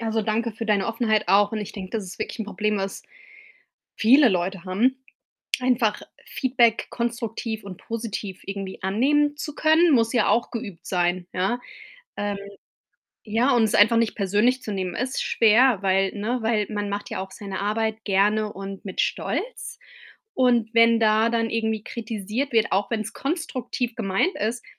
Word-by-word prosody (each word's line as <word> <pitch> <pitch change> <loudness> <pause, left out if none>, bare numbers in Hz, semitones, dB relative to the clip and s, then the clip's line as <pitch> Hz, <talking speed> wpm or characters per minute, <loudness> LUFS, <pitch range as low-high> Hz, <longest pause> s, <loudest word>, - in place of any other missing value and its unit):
Also, 225 -1 -1
danke 225 +2 -1
für 225 +1 -6
deine 205 -2 +2
Offenheit 220 -4 0
auch 205 +2 +4
und 220 - -2
ich 210 0 -6
denke, 190 -2 -7
das 215 - -3
ist 185 0 -10
wirklich - - -5
'n - - -2
Problem, 210 0 -1
was 195 0 -4 0.9
viele 255 +4 +6
Leute 185 0 -2
haben. 230 +8 +1 0.6
Einfach 240 -4 +1 0.2
Feedback 240 -4 +1
konstruktiv 230 -2 -3
und 190 -2 -9
positiv 215 -4 -5
irgendwie 195 -1 -6
annehmen 290 +10 +2
zu 300 -1 -6
können, 315 +1 +4
muss 230 -1 +2
ja 235 -4 +2
auch 235 - +2
geübt 225 -7 -7
sein, 175 0 0
ja. 190 +7 -1 0.6
Ähm, 205 -1 -2 0.9
ja, 235 +5 +2
und 235 - +4
es 215 - +1
einfach 220 +3 +6
nicht 230 -1 +1
persönlich 210 +6 +1
zu 215 - -5
nehmen 185 -3 -3
ist 255 +3 -2
schwer, 230 0 +4
weil, 195 0 +2
ne 225 +4 -2
weil 220 -2 +1
man 205 -1 -3
macht 200 0 -4
ja - - -4
auch 190 0 -6
seine 195 -1 -6
Arbeit 220 +2 -1
gerne 210 +2 +2
und 195 0 -8
mit 190 - -7
Stolz - - -3 0.6
und 240 -4 +2
wenn 230 0 +5
da 220 0 +4
dann 230 -1 0
irgendwie 220 -1 -1
kritisiert 225 +3 -4
wird, 225 -1 +2
auch 200 +3 +1
wenn‘s 220 -2 -2
konstruktiv 260 -6 -3
gemeint 210 - 0
ist, 230 +3 -2
220 Hz, 165 wpm, -24 LUFS, 200-235 Hz, 0.9 s, viele